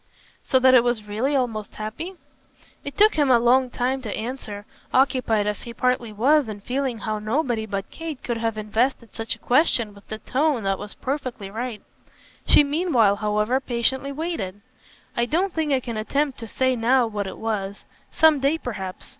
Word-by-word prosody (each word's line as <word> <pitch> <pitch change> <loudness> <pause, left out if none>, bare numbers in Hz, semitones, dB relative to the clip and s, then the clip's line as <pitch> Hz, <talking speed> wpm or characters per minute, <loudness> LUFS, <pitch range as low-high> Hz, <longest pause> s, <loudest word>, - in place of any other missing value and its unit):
"So 260 - +2
that 260 0 +5
it 245 -2 +7
was 240 -3 0
really 240 +8 0
almost 225 -6 -2
happy?" 225 - -6 0.7
It 285 - -7
took 425 +1 +6
him 295 -3 +2
a 250 - +7
long 250 +2 +3
time 255 +2 -1
to 220 -5 -4
answer, 215 -3 -6 0.3
occupied 255 -5 +2
as 210 -1 -2
he 235 -1 -9
partly 250 -3 0
was 260 +5 +3
in 205 -1 -7
feeling 255 +1 -2
how 215 0 -3
nobody 225 0 -1
but 195 -1 -4
Kate 325 -4 -7
could 240 -2 -2
have 225 -1 -2
invested 225 +3 -1
such 225 0 -2
a - - -20
question 245 -5 +3
with 200 0 -17
the 215 - -5
tone 265 +1 0
that 195 0 0
was 205 0 -7
perfectly 255 -7 -4
right. 230 0 -5 0.6
She - - +7
meanwhile, 280 - +2
however, 210 +4 +1
patiently 265 +2 0
waited. 280 - -4 0.5
"I 235 0 +1
don't 355 +7 0
think 315 -2 -1
I 270 - +3
can 235 -3 -5
attempt 275 +5 -1
to 230 - -7
say 260 +3 +1
now 245 +2 +3
what 205 -3 -3
it - - -7
was. 205 -3 -3 0.2
Some 315 -2 +4
day 280 +4 +2
perhaps. 200 -10 -6
240 Hz, 185 wpm, -24 LUFS, 215-270 Hz, 0.7 s, it